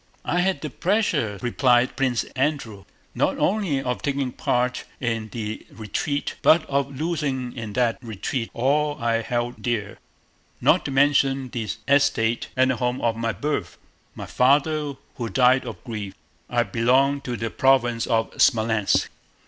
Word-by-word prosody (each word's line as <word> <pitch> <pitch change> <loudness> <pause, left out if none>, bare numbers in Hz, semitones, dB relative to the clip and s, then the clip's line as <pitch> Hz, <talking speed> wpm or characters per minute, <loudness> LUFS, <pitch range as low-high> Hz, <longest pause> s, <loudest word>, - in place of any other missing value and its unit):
"I 175 - +1
had 185 -5 +1
the 150 - -5
pleasure," 170 - 0
replied 125 0 +2
Prince 130 -4 +1
Andrew, 130 -8 -2 0.3
"not - - 0
only 190 -9 +1
of 125 -1 -2
taking 140 -2 -1
part 125 +1 -1 0.2
in 115 -3 -2
the 110 -2 -5
retreat 140 +7 -3
but 160 0 +5
of 140 -1 -1
losing 145 -6 -2
in 110 -4 -6
that 120 0 +1
retreat 115 +1 -4
all 145 +4 +1
I 115 -1 +1
held 120 +1 -3
dear—not 110 -5 -2
to - - -2
mention 135 -1 +2
the 115 -4 -4 0.2
estate 120 -5 +2
and 130 0 +4
home 125 0 -1
of 115 -1 +1
my 115 0 -1
birth—my 105 - -6
father, 145 +2 +2 0.2
who 115 -2 -3
died 130 +1 +4
of 115 - -8
grief. 105 -5 -6 0.3
I - - +2
belong 135 +4 +2
to 125 -3 -4
the 115 0 -3
province 120 -3 +2
of 115 -1 +1
Smolénsk." 110 -2 +2
125 Hz, 140 wpm, -24 LUFS, 115-140 Hz, 0.3 s, but